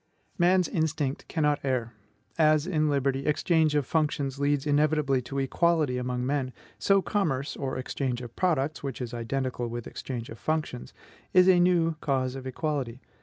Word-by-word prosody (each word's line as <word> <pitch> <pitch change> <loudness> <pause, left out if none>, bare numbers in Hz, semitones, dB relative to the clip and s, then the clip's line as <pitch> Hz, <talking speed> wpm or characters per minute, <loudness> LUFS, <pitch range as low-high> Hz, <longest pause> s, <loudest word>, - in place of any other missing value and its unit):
Man's 180 +1 +4
instinct 155 -4 -1
cannot 150 -3 +1
err; 125 -4 -1 0.4
as, 155 -1 +4
in 155 -4 +1
liberty, 140 -1 0
exchange 155 0 +2
of 145 -3 +2
functions 145 -3 -1
leads 145 0 +1
inevitably 145 -2 +2
to 125 +3 -6
equality 145 -1 +1
among 125 0 -2
men, 130 -2 -1 0.3
so 195 -1 +3
commerce 150 -10 -1
or 135 -1 -3
exchange 130 -1 -2
of 120 -1 -10
products, 155 -5 0
which 135 -3 -5
is 120 -2 -5
identical 125 +1 -2
with 120 0 -5
exchange 120 -3 -6
of 115 - -9
functions 155 - -2 0.4
is 185 0 +6
a 185 -2 +6
new 170 -3 +3
cause 130 -3 0
of 130 -1 -7
equality. 130 -3 -3
140 Hz, 160 wpm, -27 LUFS, 130-155 Hz, 0.4 s, is